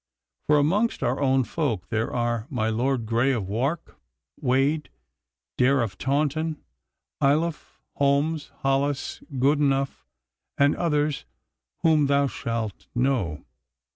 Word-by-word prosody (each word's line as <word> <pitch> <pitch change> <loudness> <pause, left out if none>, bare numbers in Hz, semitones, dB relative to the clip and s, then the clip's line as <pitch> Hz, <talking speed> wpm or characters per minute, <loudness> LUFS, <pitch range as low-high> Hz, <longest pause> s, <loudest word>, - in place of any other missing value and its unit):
For 150 - +5
amongst 195 +11 +1
our 125 +4 0
own 135 -1 +3
folk 115 - -2
there 110 0 -1
are 120 -1 -1
my 110 -5 -1
Lord 120 +2 0
Grey 120 +4 +2
of 110 -7 -2
Wark, 135 - -2 0.4
Wade, 140 +3 +1 0.7
Dare 130 0 +4
of 95 -5 -5
Taunton, 150 +3 0 0.6
Ayloffe, 150 +3 0 0.2
Holmes, 145 +2 +1
Hollis, 135 +1 0 0.2
Goodenough, 140 0 +1 0.5
and 140 +1 +4
others 150 -3 0 0.6
whom 155 -3 +4
thou 140 0 +3
shalt 115 -5 -4
know. 120 - 0
135 Hz, 110 wpm, -25 LUFS, 120-150 Hz, 0.7 s, For